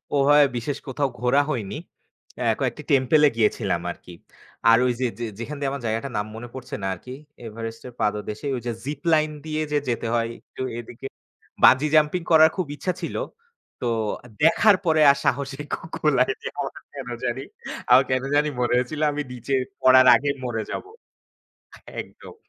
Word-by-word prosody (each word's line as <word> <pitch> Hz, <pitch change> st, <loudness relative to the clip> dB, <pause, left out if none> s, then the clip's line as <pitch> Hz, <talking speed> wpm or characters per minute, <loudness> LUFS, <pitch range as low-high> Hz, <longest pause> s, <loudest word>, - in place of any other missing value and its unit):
ওভাবে 145 Hz, +1 st, +6 dB
বিশেষ 135 Hz, +4 st, -3 dB
কোথাও 140 Hz, +1 st, -1 dB
ঘোরা 125 Hz, +3 st, +3 dB
হয়নি। 110 Hz, -5 st, -3 dB, 0.6 s
এ -, -, 0 dB, 0.2 s
কয়েকটি -, -, -2 dB
টেম্পল 135 Hz, +2 st, +4 dB
এ -, -, +4 dB
গিয়েছিলাম 110 Hz, -2 st, +1 dB
আরকি। 90 Hz, -, -12 dB, 0.6 s
আর 115 Hz, -, +7 dB
ওই 125 Hz, -, +3 dB
যে 130 Hz, -, +1 dB
যে 120 Hz, -, -2 dB
যেখান 130 Hz, +6 st, -5 dB
দিয়ে 140 Hz, -1 st, -1 dB
আমার 140 Hz, -1 st, -5 dB
জায়গাটার 115 Hz, +4 st, -2 dB
নাম 105 Hz, -, -1 dB
মনে 120 Hz, +2 st, -7 dB
পড়ছে 130 Hz, -1 st, -7 dB
না -, -, 0 dB
আরকি। 125 Hz, +8 st, -9 dB, 0.3 s
এভারেস্টের 115 Hz, +2 st, -7 dB
পাদদেশে, 105 Hz, +4 st, -2 dB
ওই 125 Hz, -, -4 dB
যে -, -, 0 dB
জিপ 145 Hz, 0 st, -4 dB
লাইন 155 Hz, 0 st, +3 dB
দিয়ে 155 Hz, 0 st, -2 dB
যে 150 Hz, -, +2 dB
যেতে 115 Hz, -1 st, -1 dB
হয় 115 Hz, -1 st, 0 dB
একটু -, -, -11 dB, 0.2 s
এদিকে। 120 Hz, +2 st, -10 dB, 0.6 s
বাঞ্জি 135 Hz, +4 st, +7 dB
জাম্পিং 155 Hz, +3 st, +3 dB
করার 160 Hz, 0 st, +8 dB
খুব 185 Hz, -4 st, -1 dB
ইচ্ছা 180 Hz, +4 st, -2 dB
ছিল। -, -, -4 dB, 0.7 s
তো 125 Hz, -, -1 dB, 0.6 s
দেখার 200 Hz, +6 st, +6 dB
পরে 160 Hz, -2 st, +3 dB
আর 140 Hz, -, -1 dB
সাহসিক 140 Hz, +2 st, -1 dB
কু -, -, -3 dB
কুলায়নি 135 Hz, -3 st, +1 dB
আমার -, -, -3 dB, 0.2 s
কেন 135 Hz, -3 st, -7 dB, 0.2 s
জানি 120 Hz, +1 st, -2 dB, 0.5 s
আমার 130 Hz, +2 st, +8 dB
কেন 130 Hz, 0 st, +1 dB
জানি 150 Hz, +1 st, +3 dB
মরে 120 Hz, -1 st, +1 dB
হয়েছিল 130 Hz, +5 st, -2 dB
আমি 145 Hz, 0 st, -3 dB
নিচে 125 Hz, +2 st, -5 dB, 0.3 s
পড়ার 130 Hz, 0 st, +7 dB
আগেই 140 Hz, 0 st, 0 dB
মরে 115 Hz, -3 st, -2 dB
যাব। -, -, -4 dB, 1.2 s
একদম। -, -, -12 dB
130 Hz, 170 wpm, -24 LUFS, 120-150 Hz, 1.2 s, করার